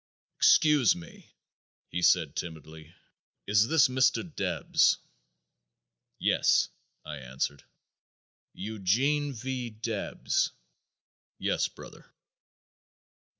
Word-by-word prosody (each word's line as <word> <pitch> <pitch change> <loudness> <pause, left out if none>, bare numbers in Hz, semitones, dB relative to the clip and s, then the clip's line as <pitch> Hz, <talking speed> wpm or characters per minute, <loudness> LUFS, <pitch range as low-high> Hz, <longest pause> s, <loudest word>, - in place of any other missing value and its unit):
"Excuse 150 -7 +5
me!" 85 -1 -13 0.6
he 90 - -3
said - - +3
timidly, 80 -1 -8 0.5
"is 105 +2 +3
this 160 0 +5
Mr. 130 0 +2
Debs?" 95 -2 +2 1.2
"Yes," - - +2 0.4
I 75 -1 -6
answered. 65 +2 -4 0.9
"Eugene 115 +9 0
V. 125 0 -4
Debs?" 110 -1 -2 0.8
"Yes, - - 0
brother." - - -14
110 Hz, 75 wpm, -28 LUFS, 85-130 Hz, 1.2 s, Excuse